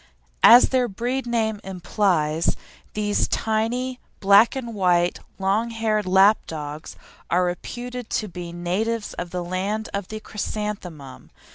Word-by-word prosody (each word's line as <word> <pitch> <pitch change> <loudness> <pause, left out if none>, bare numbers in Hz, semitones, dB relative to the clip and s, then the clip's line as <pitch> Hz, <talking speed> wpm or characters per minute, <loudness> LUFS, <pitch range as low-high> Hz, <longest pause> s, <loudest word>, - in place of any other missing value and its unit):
As 245 - +8
their 255 -2 +2
breed 245 +5 -3
name 220 -3 0
implies, 175 -4 0 0.4
these 205 -1 +1
tiny 240 +4 -1 0.2
black 200 +5 +5
and 235 -3 -5
white, 180 -3 +2 0.2
long 200 +4 0
haired 220 -3 -1
lap 195 +3 +5
dogs 150 0 -7 0.3
are 180 +1 +3
reputed 245 +7 -5
to 215 - -1
be 175 -2 -7
natives 205 +6 -2
of 175 - -5
the 180 0 -4
land 195 +5 -3
of 200 -2 -3
the 215 - -6
chrysanthemum. 195 -10 -6
205 Hz, 130 wpm, -23 LUFS, 180-225 Hz, 0.4 s, As